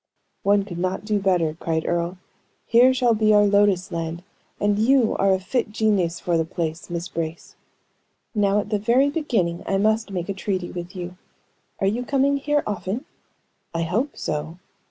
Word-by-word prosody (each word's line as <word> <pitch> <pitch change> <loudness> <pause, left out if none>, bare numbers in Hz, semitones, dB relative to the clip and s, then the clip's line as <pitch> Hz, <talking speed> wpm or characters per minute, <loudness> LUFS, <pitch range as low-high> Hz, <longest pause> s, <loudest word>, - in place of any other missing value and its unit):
"One 200 0 +3
could 175 -4 -7
not 185 +3 -2
do 210 -1 +1
better," 175 -5 +1
cried 160 -1 -1
Earle. 170 +1 -1 0.5
"Here 245 +2 +6
shall 250 -2 +3
be 215 -1 +3
our 205 0 +6
lotus 200 -2 +3
land, 165 0 -4 0.4
and 205 0 +1
you 245 +1 +3
are 195 0 +3
a 190 - +2
fit 210 +4 -2
genius 205 -6 +1
for 170 -2 0
the - - +2
place, 160 0 -4
Miss 170 +1 -3
Brace." 165 -3 -5 0.8
"Now, 205 -2 +2
at 205 - -10
the 210 - +1
very 250 +7 +3
beginning, 220 - -1
I 195 - +1
must 220 +2 +1
make 180 -3 -3
a 200 - -2
treaty 190 -2 -3
with 175 +2 -7
you. 180 0 -6 0.6
Are - - 0
you 220 +6 0
coming 280 +2 +2
here 295 +1 0
often?" 210 +6 -3 0.7
"I 165 - 0
hope 220 - -1
so." 155 +3 -3
195 Hz, 175 wpm, -23 LUFS, 175-220 Hz, 0.8 s, Here